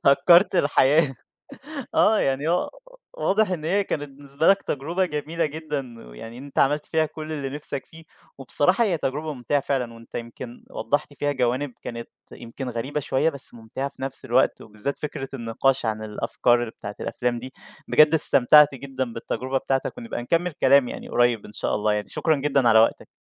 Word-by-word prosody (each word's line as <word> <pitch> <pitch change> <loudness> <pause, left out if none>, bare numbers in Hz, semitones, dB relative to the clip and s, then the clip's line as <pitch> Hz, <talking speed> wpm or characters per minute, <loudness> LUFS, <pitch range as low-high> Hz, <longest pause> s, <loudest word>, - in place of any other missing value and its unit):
هكرت 170 +8 +6
الحياة، 145 -2 +3 0.8
آه 215 0 +4
يعني 135 +3 0
هو 175 +1 +1 0.4
واضح 215 - +1
إن 170 -4 -3
هي 195 +5 +1
كانت 145 -5 -3
بالنسبة 140 +2 -2
لك 195 0 +5
تجربة 165 +7 -1
جميلة 160 +1 -2
جدًا، 145 - -6
ويعني 115 - -10
أنت 140 +2 -7
عملت 145 +2 +2
فيها 160 -1 +1
كل 155 +1 -7
اللي 140 -3 -4
نفسك 145 -1 -5
فيه، 165 0 -15 0.3
وبصراحة 165 - +2
هي 180 -7 0
تجربة 150 +3 -3
ممتعة 130 +3 0
فعلًا 130 -4 -2
وأنت 115 0 -16
يمكن 120 +1 -8
وضّحت 145 +6 -2
فيها 145 +1 -1
جوانب 130 +1 -1
كانت 115 -1 -6 0.2
يمكن 120 +3 -7
غريبة 130 +6 -3
شوية، 145 +3 +1
بس 140 -5 -5
ممتعة 120 +4 -5
في 140 - -14
نفس 135 0 -5
الوقت، 130 +1 +2
وبالذات 110 +6 -5
فكرة 135 -3 -5
النقاش 125 +1 0
عن 110 0 -2
الأفكار 120 +3 +1
بتاعة 100 -2 -8
الأفلام 120 -1 -2
دي، 130 +3 -9 0.3
بجد 155 +1 +6
استمتعت 150 -1 +6
جدًا 130 -2 -4
بالتجربة 130 +3 -2
بتاعتك 135 - -2
ونبقى 230 - -5
نكمل 170 +7 0
كلام 140 -3 +4
يعني - - -7
قريب 120 -3 +2
إن 105 - -13
شاء - - -2
الله 105 0 +1
يعني 105 0 -2
شكرًا 160 -2 +1
جدًا 140 -3 +2
على 110 -1 +6
وقتك. 115 - +1
135 Hz, 175 wpm, -24 LUFS, 120-155 Hz, 0.8 s, هكرت